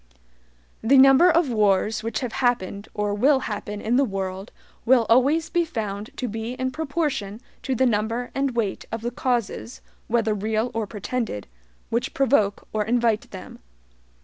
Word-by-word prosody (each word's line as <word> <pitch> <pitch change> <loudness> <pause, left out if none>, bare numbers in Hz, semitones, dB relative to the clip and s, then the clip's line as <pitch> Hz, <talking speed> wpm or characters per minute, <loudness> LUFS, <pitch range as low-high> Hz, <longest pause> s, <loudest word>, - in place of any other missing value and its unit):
The 265 +5 +4
number 270 +6 +7
of 330 -5 +2
wars 210 0 +2
which 220 0 -3
have 250 -3 -4
happened 210 -5 0
or 210 -1 -1
will 265 +6 +3
happen 210 -2 -5
in 230 +4 +1
the 280 - +4
world 195 -3 -4 0.3
will 240 -1 +4
always 285 +7 +3
be 345 - +2
found 215 -7 -4
to 250 - -2
be 225 +2 -4
in 260 0 -2
proportion 285 -9 -2 0.2
to 265 - -2
the 260 - +2
number 230 +1 -1
and 270 -2 -1
weight 215 -5 -1
of 225 - -4
the 240 +1 -3
causes, 240 -1 -2 0.3
whether 225 -2 +1
REAL 220 +3 -1
or 225 -2 -2
PRETENDED, 210 - -4 0.5
which 235 +3 -1
PROVOKE 260 -7 +2
or 215 -1 +1
INVITE 230 -1 +1
them. 190 -2 -10
230 Hz, 160 wpm, -24 LUFS, 210-260 Hz, 0.5 s, number